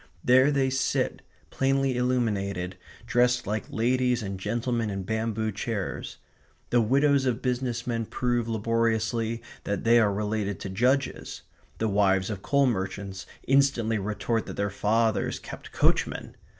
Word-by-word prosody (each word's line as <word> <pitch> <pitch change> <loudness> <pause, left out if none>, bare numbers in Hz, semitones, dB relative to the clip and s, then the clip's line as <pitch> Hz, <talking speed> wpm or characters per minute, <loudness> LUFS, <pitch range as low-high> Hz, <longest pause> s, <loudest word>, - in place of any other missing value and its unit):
There 130 +3 +5
they 135 -2 +1
sit, 130 0 0 0.3
plainly 135 -1 +1
illuminated, 100 -7 -1 0.3
dressed 125 +1 +2
like 105 +1 -3
ladies 125 +1 +1
and 95 -1 -5
gentlemen, 115 +2 -1
in 95 -1 -3
bamboo 110 +1 -1
chairs. 110 -5 -4 0.5
The 120 - +4
widows 140 +3 +3
of 125 -1 -1
business 125 -2 -1
men 115 -2 -2
prove 120 -2 -1
laboriously 115 +1 0 0.2
that 100 - -2
they 115 +1 +6
are 105 -3 +3
related 105 -1 -2
to 95 - -4
judges. 125 +7 0 0.3
The 110 - 0
wives 100 -1 +2
of 100 -2 -5
coal 140 +4 +3
merchants 95 -3 -3 0.2
instantly 130 -5 +3
retort 105 +3 -2
that - - -6
their 100 0 -1
fathers 110 +2 +1
kept - - -10
coachmen. - - 0
115 Hz, 135 wpm, -27 LUFS, 105-125 Hz, 0.5 s, they